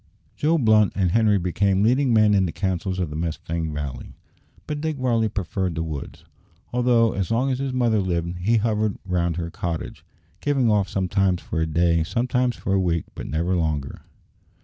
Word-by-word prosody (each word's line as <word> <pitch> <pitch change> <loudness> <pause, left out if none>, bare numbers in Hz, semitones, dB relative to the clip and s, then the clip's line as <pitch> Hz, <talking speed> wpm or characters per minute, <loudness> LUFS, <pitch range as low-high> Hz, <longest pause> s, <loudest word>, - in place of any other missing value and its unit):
Joe 160 +3 +2
Blunt 110 -6 +4
and 95 -3 +1
Henri 110 -1 +3
became 95 +2 +1
leading 130 +4 +3
men 110 -2 +5
in 95 -2 +3
the - - -4
councils 95 0 -2
of 90 -5 -2
the - - -6
Mustang 80 0 -3
Valley; 70 -4 -6 0.5
but 150 -1 -4
Dick 155 -2 -2
Varley 115 -4 +1
preferred 95 -3 -2
the 80 - -1
woods, 75 -4 -7 0.5
although, 120 -2 +3
as 95 -3 -2
long 125 +4 +1
as 130 - -1
his 135 -1 -2
mother 120 -4 +2
lived, 85 -2 -2
he 110 +6 +2
hovered 110 -1 0
round 85 -3 0
her 85 -1 -4
cottage 85 -2 -5 0.4
going 135 -6 +2
off 100 -2 +2
sometimes 95 -1 +1
for 80 - -2
a 80 - 0
day, 85 +1 +2
sometimes 125 +5 0
for 95 - -2
a 95 - +3
week, 85 -3 0
but - - -7
never 85 +4 0
longer. 75 -5 -2
95 Hz, 185 wpm, -23 LUFS, 85-115 Hz, 0.5 s, men